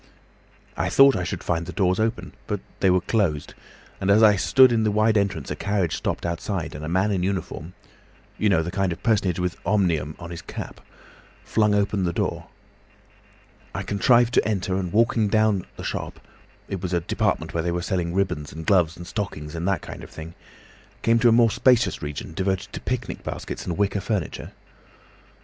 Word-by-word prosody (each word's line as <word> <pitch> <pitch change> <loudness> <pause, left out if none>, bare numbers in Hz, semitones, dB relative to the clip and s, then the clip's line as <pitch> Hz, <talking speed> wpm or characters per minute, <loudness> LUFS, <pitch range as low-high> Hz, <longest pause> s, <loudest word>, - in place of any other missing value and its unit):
I 85 - -1
had 95 - -2
thought 135 0 +7
I 90 - -1
should 90 - -4
find 85 -1 -1
the - - -5
doors 95 +1 +1
open, 110 +2 -1
but 105 -2 -2 0.2
they 95 - +3
were 90 0 +3
closed, 85 -9 0 0.5
and 95 - -1
as 105 +3 +6
I 105 -2 +7
stood 130 +7 +5
in 115 -1 +2
the 110 - +2
wide 110 +1 +2
entrance 100 -8 0
a - - -1
carriage 100 -4 -1
stopped - - -3
outside, 85 +1 -3
and 75 - -7
a 75 - -4
man 95 +4 +1
in 95 -3 0
uniform—you 95 +2 -5
know 85 -5 +3
the 85 - -4
kind 95 -1 0
of 85 - -7
personage 100 -7 +2
with 90 -1 -2
'Omnium' 85 -8 +1
on 85 -1 -9
his 85 - -6
cap—flung 105 -2 -4
open 100 -1 +1
the 85 -1 0
door. - - -2 1.3
I - - -2
contrived 120 +3 +3
to - - +3
enter, 95 -3 -1
and 95 -2 -2
walking 115 0 +3
down 110 -2 +2
the - - -7
shop—it 95 -3 -7
was 90 -1 -3
a 85 - +2
department 85 - -1
where 85 - 0
they 85 +1 -1
were 85 0 -2
selling 90 -3 -1
ribbons 75 -7 -1
and 80 0 -8
gloves 85 -4 +3
and 85 - -8
stockings 85 -8 -5
and 85 +2 -3
that 100 -2 0
kind - - -8
of - - -10
thing—came 85 +7 -4
to 120 0 +5
a - - +5
more 115 -1 +5
spacious 125 0 +3
region 75 +1 -6
devoted 95 +3 -2
to - - -6
picnic 125 -1 -4
baskets - - -6
and 85 - -2
wicker 100 0 0
furniture. 100 -4 -3
95 Hz, 190 wpm, -24 LUFS, 85-105 Hz, 1.3 s, thought